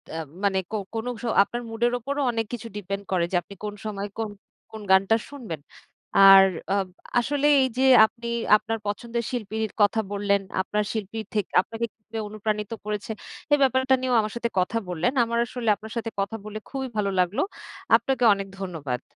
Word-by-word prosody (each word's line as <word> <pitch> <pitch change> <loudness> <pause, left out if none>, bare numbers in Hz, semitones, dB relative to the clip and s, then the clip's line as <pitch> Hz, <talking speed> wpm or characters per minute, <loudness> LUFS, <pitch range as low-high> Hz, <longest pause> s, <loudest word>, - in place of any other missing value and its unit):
এ - - -3 0.3
মানে 195 -1 +2
কো - - -2 0.2
কোনো 225 +2 -3
স - - -14 0.2
আপনার 240 +4 -5
মুডের 235 +2 +1
উপরও 280 +4 -3
অনেক 225 -1 -1
কিছু 235 -1 -5
ডিপেন্ড 195 0 -4
করে 180 -2 +2
যে - - -1
আপনি 200 - -13
কোন 210 -1 -3
সময় 205 -1 -3
কোন 225 -1 -2 0.4
কোন 220 -1 -8
গানটা 195 +3 +5
শুনবেন। 235 - -7 0.6
আর 195 0 +10 0.3
আব 195 -2 +1 0.3
আসলে 290 +4 +1 0.2
এইযে 260 0 -1 0.2
আপনি 235 +2 -7 0.3
আপনার 225 +1 -3
পছন্দের 235 +3 -3
শিল্পীর 220 -2 -3
কথা 205 +2 +4
বললেন, 200 0 +1 0.2
আপনার 210 +2 -1
শিল্পী 220 0 -4
থেকে 210 -3 -1
আপনাকে 225 +3 -4
কিভাবে 225 0 -8
অনুপ্রাণিত 210 0 -3
করেছে। 210 +1 -3 0.4
এই 290 - +7
ব্যাপারটা 260 0 +3
নিয়েও 255 -1 +1
আমার 215 -1 -4
সাথে 235 0 -1
কথা 185 +5 0
বললেন। 180 +7 0
আমার 235 0 -1
আসলে 235 -2 -3
আপনার 215 +2 -11
সাথে 225 0 -2
কথা 200 +3 -1
বলে 215 0 -6
খুবই 265 -1 -3
ভালো 200 -1 +1
লাগলো। 180 +3 +1 0.6
আপনাকে 265 -2 -1
অনেক 195 0 -4
ধন্যবাদ। 150 -10 -4
215 Hz, 175 wpm, -25 LUFS, 200-235 Hz, 0.6 s, আর